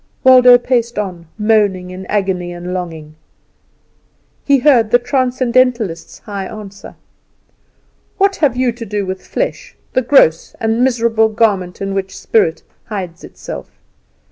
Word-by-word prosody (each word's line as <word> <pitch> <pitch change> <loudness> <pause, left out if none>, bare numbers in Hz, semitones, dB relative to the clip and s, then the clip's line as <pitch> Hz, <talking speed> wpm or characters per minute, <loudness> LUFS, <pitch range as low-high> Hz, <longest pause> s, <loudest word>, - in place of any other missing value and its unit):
Waldo 250 -1 +8
paced 240 -2 -1
on, 180 -5 -4
moaning 205 -4 +1
in 185 +1 -9
agony 190 -4 -1
and 175 +1 -6
longing. 165 -4 -6 1.3
He 280 -1 +4
heard 245 -5 +3
the 245 - +5
Transcendentalist's 250 - 0
high 200 -4 -6
answer. 200 -2 -10 1.2
"What 390 -1 +2
have 280 -5 +1
you 255 -1 +1
to 230 0 -8
do 205 0 -2
with 190 0 -5
flesh, - - -4 0.2
the 255 - +2
gross 230 - +3
and 225 +2 0
miserable 230 -3 +2
garment 200 -5 0
in 195 0 -3
which 195 0 -4
spirit 165 -7 0 0.2
hides 185 -6 -6
itself? - - -9
215 Hz, 130 wpm, -16 LUFS, 185-245 Hz, 1.3 s, Waldo